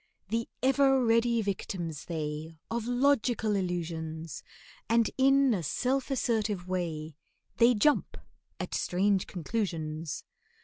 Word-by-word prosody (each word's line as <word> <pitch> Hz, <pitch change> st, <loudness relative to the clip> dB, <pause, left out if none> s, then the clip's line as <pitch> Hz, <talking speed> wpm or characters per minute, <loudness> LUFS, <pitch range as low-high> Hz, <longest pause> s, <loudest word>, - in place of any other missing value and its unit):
The 230 Hz, +2 st, -1 dB
ever 270 Hz, -1 st, +4 dB
ready 230 Hz, 0 st, +3 dB
victims 175 Hz, -6 st, -4 dB
they, 155 Hz, -1 st, -4 dB
Of 235 Hz, 0 st, -2 dB
logical 245 Hz, -4 st, +2 dB
illusions, 165 Hz, -4 st, -3 dB, 0.5 s
And 230 Hz, 0 st, +3 dB
in 270 Hz, -1 st, +4 dB
a 190 Hz, -, -1 dB
self 255 Hz, -, 0 dB
assertive 220 Hz, -8 st, 0 dB
way 160 Hz, -4 st, -3 dB, 0.4 s
They 240 Hz, +1 st, +6 dB
jump 295 Hz, +8 st, +2 dB, 0.4 s
at -, -, -4 dB
strange 195 Hz, +1 st, +1 dB
conclusions. 165 Hz, -5 st, -3 dB
205 Hz, 105 wpm, -30 LUFS, 165-240 Hz, 0.5 s, They